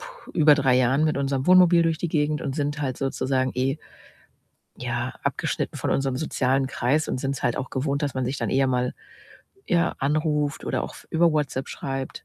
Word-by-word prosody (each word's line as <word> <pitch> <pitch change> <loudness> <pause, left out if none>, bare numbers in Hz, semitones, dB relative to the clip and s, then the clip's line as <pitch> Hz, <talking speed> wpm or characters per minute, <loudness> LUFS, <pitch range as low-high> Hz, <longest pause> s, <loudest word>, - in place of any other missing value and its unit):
puh, - - -12
über 150 -3 +6
3 135 -3 +3
Jahren 130 +4 +3
mit 155 -2 +1
unserem 135 -1 -1
Wohnmobil 180 -2 +6
durch 165 -1 +1
die 175 - -2
Gegend 150 -1 0
und 135 -2 -3
sind 145 0 -2
halt 130 -3 -2
sozusagen 130 -1 -1
eh, 135 +3 0 1.0
ja, 120 +1 -3
abgeschnitten - - -2
von - - -2
unserem 135 -2 0
sozialen 135 -2 0
Kreis 135 +4 0
und - - -2
sind's 135 0 -3
halt 120 - +1
auch 130 - -4
gewohnt, 140 +2 -1
dass 145 - -1
man 130 -1 -1
sich 130 +3 -2
dann - - -2
eher 135 0 +3
mal, 125 -1 0 0.7
ja, 175 0 +1
anruft 150 0 0
oder - - -1
auch - - -6
f - - -14
über 165 0 +3
WhatsApp 140 -3 -1
schreibt. 135 -1 -5
140 Hz, 195 wpm, -24 LUFS, 130-155 Hz, 1.0 s, über